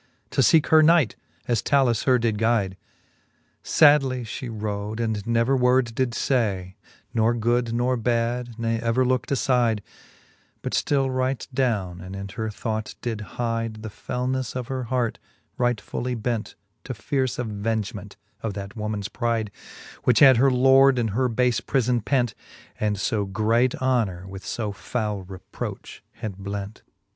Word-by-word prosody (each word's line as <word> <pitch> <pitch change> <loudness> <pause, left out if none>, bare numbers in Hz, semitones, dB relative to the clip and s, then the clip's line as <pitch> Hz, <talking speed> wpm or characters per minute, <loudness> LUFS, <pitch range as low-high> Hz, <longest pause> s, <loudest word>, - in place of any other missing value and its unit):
To - - +2
feeke 160 -3 +4
her 160 0 +7
knight, 160 -6 +4 0.3
as 120 -3 +1
Talus 130 -5 +2
her 130 -2 +5
did 115 -3 0
guide: 110 -4 +1 0.9
Sadly 140 -5 +4
flie 120 +3 -6
rode, 105 0 -4
and 110 -3 -1
never 115 +3 +2
word 125 -2 +3
did 120 0 -1
{ay, 100 -8 0 0.4
Nor 115 0 +2
good 120 +1 +1
nor 120 +2 +1
bad, 120 0 -1
ne 115 -1 -1
ever 115 +3 +1
lookt 125 -1 0
afide, 120 -5 +2 0.8
But - - -3
ftill 135 -2 +1
right 130 0 -1
downe, 105 -9 -1
and 95 +1 -8
in 100 0 -5
her 110 +2 -4
thought 110 0 -4
did 115 -3 -3 0.2
hide 115 -2 -2
The 110 - -5
felnefTe 125 +2 -3
of 125 -2 -4
her 130 -2 -3
heart, 120 -1 -1 0.4
right 120 -3 +2
fully 125 +4 -4
bent 115 -1 -3 0.3
To 130 - -5
fierce 130 +3 -1
avengement 105 -3 -3 0.2
of 110 -4 -3
that 100 +3 -7
woman's 105 -2 -3
pride, 115 -2 -1 0.5
Which 125 -3 +3
had 130 0 +8
her 135 +3 +5
lord 135 +1 +5
in 115 -2 +1
her 125 +5 +1
bafe 125 0 +1
prifbn 125 -3 +1
pent, 125 -2 +1 0.5
And 105 -2 0
fo 105 0 0
great 110 +5 +1
honour 115 -9 0
with 95 0 -9
fb 105 -3 -3
fowle 105 -3 -3
reproch 95 -1 -7
had 110 -5 -6
blent; 100 +1 -5
XIX. - - -28
115 Hz, 155 wpm, -24 LUFS, 105-125 Hz, 0.9 s, had